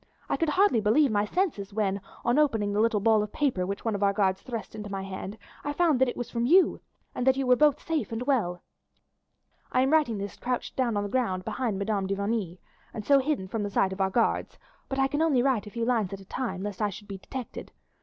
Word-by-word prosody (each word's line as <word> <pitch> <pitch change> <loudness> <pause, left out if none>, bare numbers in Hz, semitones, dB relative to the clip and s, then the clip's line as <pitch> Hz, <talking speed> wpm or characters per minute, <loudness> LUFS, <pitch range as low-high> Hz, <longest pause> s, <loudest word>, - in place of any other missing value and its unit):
I - - 0
could 330 - 0
hardly 370 - +3
believe 235 +6 +3
my 205 -1 +2
senses 210 - -2
when, 200 -2 0 0.2
on 240 +5 +3
opening 220 -9 +2
the 205 - +1
little 225 -1 +3
ball 220 +1 +4
of 210 0 -4
paper 245 -12 0
which 200 +3 -5
one 225 - +1
of 200 - -3
our 200 0 +3
guards 190 -2 +1
thrust 230 -3 -6
into 210 -1 -7
my 195 -1 -4
hand, 195 +2 -6 0.3
I 290 - -2
found 310 -5 +2
that 260 - +4
it - - -6
was 245 -1 -5
from 235 0 0
you, 360 +5 +4 0.3
and 250 - -2
that 265 0 +5
you 270 - 0
were 250 0 +5
both 295 +1 +4
safe 320 -6 -2
and 225 +2 -3
well. 215 -10 0 1.1
I 255 - +3
am 265 +3 +2
writing 290 -9 +3
this 200 0 -6
crouched 250 0 -3
down 240 -5 0
on 205 - 0
the 205 - -4
ground 190 -7 -1
behind 235 -6 -2
Madame 200 -1 -1
de 195 - -1
Vigny, 200 -3 -2 0.4
and 210 - -5
so 280 -1 +5
hidden 265 -8 -1
from 215 +3 -3
the 205 - -2
sight 190 -1 +1
of 190 - -4
our 190 - +2
guards, 230 +4 0 0.3
but 270 - -3
I 270 - +3
can 290 +3 -1
only 285 -7 +3
write 255 -6 +1
a - - -6
few 230 +2 -3
lines 230 -6 +1
at 195 - -6
a 195 - -13
time, 195 -4 -4
lest 205 0 -5
I 210 - +2
should 205 +1 -10
be 195 -1 -7
detected. 255 +5 -7
225 Hz, 255 wpm, -27 LUFS, 200-260 Hz, 1.1 s, that